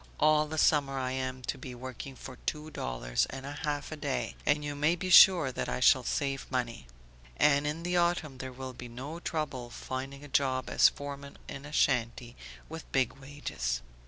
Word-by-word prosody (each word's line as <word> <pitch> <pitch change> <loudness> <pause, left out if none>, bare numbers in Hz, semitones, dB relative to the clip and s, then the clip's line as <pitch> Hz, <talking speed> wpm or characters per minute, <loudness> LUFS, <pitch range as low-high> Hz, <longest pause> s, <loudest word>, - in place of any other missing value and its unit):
All 155 0 +4
the 160 +1 -5
summer 140 -3 +3
I 130 -1 -1
am 130 -1 -3
to 135 - -3
be 125 -1 -7
working 130 +2 -7
for 130 0 -10
two 155 0 -2
dollars - - -1
and 135 0 -7
a 140 - -5
half 145 -1 -2
a - - -3
day 145 -3 -2
and 145 0 +2
you 145 - -3
may 150 +4 +2
be 185 +1 -3
sure 175 -7 +8
that - - -3
I - - -2
shall 125 0 +5
save 135 +1 -2
money. 120 - -3 0.5
And 145 0 +4
in 155 +3 -3
the 175 +1 0
autumn 170 -6 +1
there 130 0 -5
will 130 0 -7
be 125 0 -9
no 135 +8 -7
trouble 145 -8 -3
finding 135 +3 -6
a - - -9
job 130 -2 0
as - - +7
foreman 140 0 -8
in 135 - -7
a - - -10
shanty, 120 -4 +1 0.3
with 160 0 -9
big 130 -3 +2
wages. 65 - -4
135 Hz, 195 wpm, -30 LUFS, 130-150 Hz, 0.5 s, sure